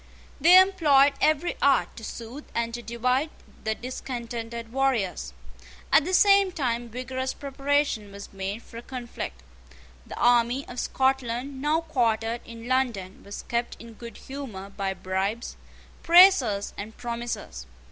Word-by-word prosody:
They 345 +6 +8
employed 300 -8 +5
every 310 +3 +2
art 280 -1 +3
to 225 - -10
soothe 235 +6 -8
and 230 0 -1
to 240 - -4
divide 250 +5 0 0.3
the 220 0 -1
discontented 235 -2 -6
warriors. 255 - 0 0.6
At - - +6
the 370 - -3
same 395 -1 +5
time 240 -7 -2
vigorous 260 +2 -4
preparation 275 -6 -1
was 200 0 -10
made 195 +3 -4
for 230 - -12
a - - -6
conflict. 240 - -7 0.6
The - - -8
army 240 +2 +3
of 245 - -7
Scotland, 265 0 -1
now 305 +3 +2
quartered 235 -6 0
in 230 0 -10
London, 235 -8 -1
was 200 - -8
kept 235 0 -2
in 230 0 -11
good 235 +1 -10
humour 225 -9 -8
by 195 -1 -3
bribes, 195 +6 -3 0.5
praises, 335 - +5
and 215 +2 -7
promises. 235 - -5
240 Hz, 135 wpm, -26 LUFS, 225-275 Hz, 0.6 s, They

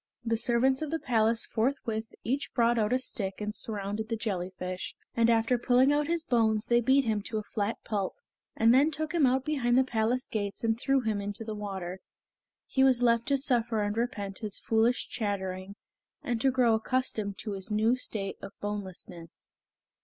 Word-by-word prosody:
The 230 0 +1
servants 245 +4 +2
of 310 - -2
the 325 - 0
palace 230 -5 +1
forthwith 225 -2 -1 0.2
each 280 +4 -2
brought 235 -1 +3
out 215 0 +1
a 255 - +4
stick 200 -7 -3
and 210 0 -3
surrounded 210 0 -3
the 230 - 0
jellyfish, 185 -3 -4 0.2
and 230 0 +4
after 230 +1 +3
pulling 255 +3 +4
out 295 0 +1
his 335 -1 0
bones 220 -6 +2
they 240 0 +3
beat 265 +3 +4
him 215 -2 0
to 220 +2 -4
a 215 - -2
flat 205 +1 -2
pulp, 200 -4 -2 0.4
and 230 +1 +5
then 280 +4 +5
took 310 +1 -4
him 315 -6 +4
out 260 +1 +1
beyond 255 -5 +1
the 260 - +6
palace 240 0 0
gates 205 -1 -3
and 225 0 +1
threw 270 +1 +2
him 215 -3 -1
into 205 +2 -5
the 220 -1 -5
water. 190 -3 -5 0.7
Here 265 - 0
he - - +7
was 255 -2 +4
left 235 -1 +3
to 280 - +3
suffer 240 -5 +1
and 205 0 -1
repent 205 -4 -3
his 210 -3 -4
foolish 225 +2 +1
chattering, 195 -2 -3 0.5
and 235 -2 -1
to 270 - +4
grow 250 -3 +3
accustomed 220 -3 -1
to 215 - -5
his 195 +1 -5
new 220 +3 +3
state 205 -6 -3
of 195 0 -8
bonelessness. 190 -5 -7
225 Hz, 190 wpm, -29 LUFS, 205-250 Hz, 0.7 s, he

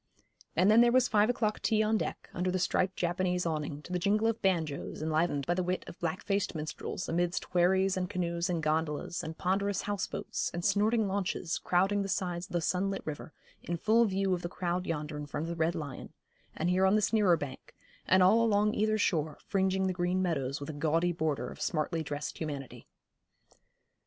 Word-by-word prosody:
And 185 +5 +5
then 225 +2 +7
there 240 0 +5
was 255 0 +4
five 210 0 +3
o'clock 220 -3 0
tea 215 -1 +2
on 215 +1 +2
deck, - - -3
under 180 +1 -1
the 185 - 0
striped 185 +1 +1
Japanese 180 0 0
awning, 150 -2 -3
to - - -10
the 180 - +1
jingle 210 +5 +2
of 225 0 0
banjos, 165 -7 -1
enlivened 155 -2 0
by 175 - +1
the 185 - 0
wit 180 +1 -1
of - - -11
black 170 +1 -2
faced 200 -2 -1
minstrels, 155 +3 -4
amidst 175 +1 -1
wherries 190 +2 +3
and 180 -1 -2
canoes 170 0 -1
and 170 -3 -1
gondolas, 155 +1 -1
and 160 0 -7
ponderous 195 +2 0
houseboats, 205 -2 -2
and 175 - -3
snorting 210 +2 +2
launches, 190 -3 -2
crowding 195 +3 +2
the 195 - -3
sides 180 -2 -2
of - - -13
the 175 - +1
sunlit 190 +4 -1
river, 155 0 -6 0.3
in 175 - -3
full 225 +6 +4
view 195 -2 0
of 175 - -1
the 175 - -4
crowd 180 0 -2
yonder 150 -2 -3
in 150 0 -6
front 145 +1 -3
of 165 - -4
the 170 - -3
Red 165 +1 +1
Lion, 145 -5 -6 0.4
and 175 +3 +1
here 190 +1 +4
on 190 - +4
this 215 +1 +1
nearer 200 -6 +4
bank, 140 -4 -8 0.3
and 185 0 +5
all 220 +5 +5
along 210 -1 +3
either 215 +1 +1
shore, 160 -7 0
fringing 190 0 +1
the 185 - 0
green 180 +1 0
meadows 140 -7 -1
with 145 +2 -5
a - - -10
gaudy 165 +4 +1
border 155 -4 -2
of - - -11
smartly 160 +1 -1
dressed 145 -1 -5
humanity. 145 -5 -6
180 Hz, 205 wpm, -31 LUFS, 160-195 Hz, 0.4 s, then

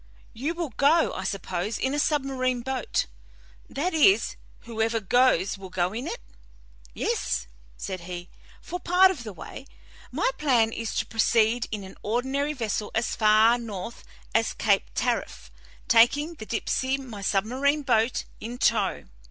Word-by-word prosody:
You 290 +9 -3
will 335 -3 -3
go, 290 +8 +3
I 190 - -4
suppose, 190 +2 -3
in 265 +1 -1
a 295 - 0
submarine 265 -4 0
boat 260 -1 -1 0.6
that 345 +7 -2
is, 355 +5 +4 0.3
whoever 225 0 -1
goes 200 -3 +2
will 190 -1 -9
go 180 +1 -1
in 235 +4 -4
it?" - - -3 0.8
"Yes," - - -1 0.3
said 185 -1 -5
he, 175 0 -7 0.4
"for 355 - -5
part 365 +2 +5
of 300 -10 -6
the 215 - -6
way. 265 +8 -10 0.4
My - - 0
plan 240 -7 +3
is 230 -2 -4
to - - 0
proceed 225 +1 +2
in 210 -2 -4
an 190 - -11
ordinary 265 +6 -1
vessel 220 -5 -2
as 225 +2 0
far 220 +2 +5
north 220 -1 -7 0.3
as - - +1
Cape - - +2
Tariff, - - -2 0.4
taking 280 +8 +4
the 220 -10 -10
Dipsey, 260 +3 -1
my 240 -7 -8
submarine 255 +10 +1
boat, 240 -2 +1
in 235 +2 -6
tow. - - +1
235 Hz, 150 wpm, -26 LUFS, 215-275 Hz, 0.8 s, part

